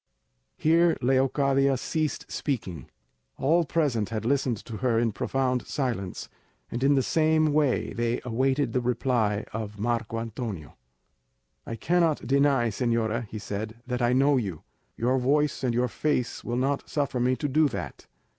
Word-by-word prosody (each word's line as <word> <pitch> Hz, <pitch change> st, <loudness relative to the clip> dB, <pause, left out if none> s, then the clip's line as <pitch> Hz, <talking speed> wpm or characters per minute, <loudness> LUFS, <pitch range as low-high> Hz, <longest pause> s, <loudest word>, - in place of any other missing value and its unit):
Here 165 Hz, +2 st, +3 dB
Leocadia 135 Hz, +1 st, +2 dB
ceased 155 Hz, +4 st, -2 dB
speaking. 95 Hz, -, -3 dB, 0.5 s
All 165 Hz, +5 st, +2 dB
present 135 Hz, -9 st, 0 dB
had 110 Hz, -1 st, -3 dB
listened 130 Hz, -2 st, +1 dB
to 115 Hz, -3 st, -6 dB
her 120 Hz, -2 st, +1 dB
in 115 Hz, -1 st, +2 dB
profound 130 Hz, +2 st, -1 dB
silence, 115 Hz, -10 st, -3 dB, 0.4 s
and 120 Hz, +2 st, -3 dB
in 140 Hz, +1 st, +4 dB
the 135 Hz, -, +2 dB
same 155 Hz, 0 st, +2 dB
way 145 Hz, -4 st, +1 dB
they 120 Hz, 0 st, -1 dB
awaited 130 Hz, +4 st, 0 dB
the 125 Hz, -, +1 dB
reply 120 Hz, -4 st, 0 dB
of 105 Hz, -2 st, -5 dB
Marco 115 Hz, +1 st, -1 dB
Antonio. 110 Hz, -, -6 dB, 0.9 s
"I 115 Hz, -, -4 dB
cannot 165 Hz, +4 st, +1 dB
deny, 135 Hz, -2 st, +3 dB
señora," 115 Hz, 0 st, 0 dB
he 110 Hz, -, -7 dB
said, 105 Hz, +1 st, -5 dB
"that 125 Hz, -1 st, -3 dB
I 120 Hz, 0 st, +3 dB
know 135 Hz, +2 st, +4 dB
you; 95 Hz, -10 st, -3 dB, 0.3 s
your 125 Hz, +3 st, +1 dB
voice 145 Hz, +2 st, +1 dB
and 125 Hz, -, +2 dB
your 125 Hz, +1 st, +2 dB
face 125 Hz, +2 st, -1 dB
will 120 Hz, 0 st, -2 dB
not 135 Hz, +2 st, -1 dB
suffer 140 Hz, -4 st, -1 dB
me 125 Hz, +1 st, +2 dB
to 145 Hz, -, -2 dB
do 150 Hz, +3 st, +3 dB
that. 130 Hz, -, -6 dB
125 Hz, 155 wpm, -27 LUFS, 115-140 Hz, 0.9 s, in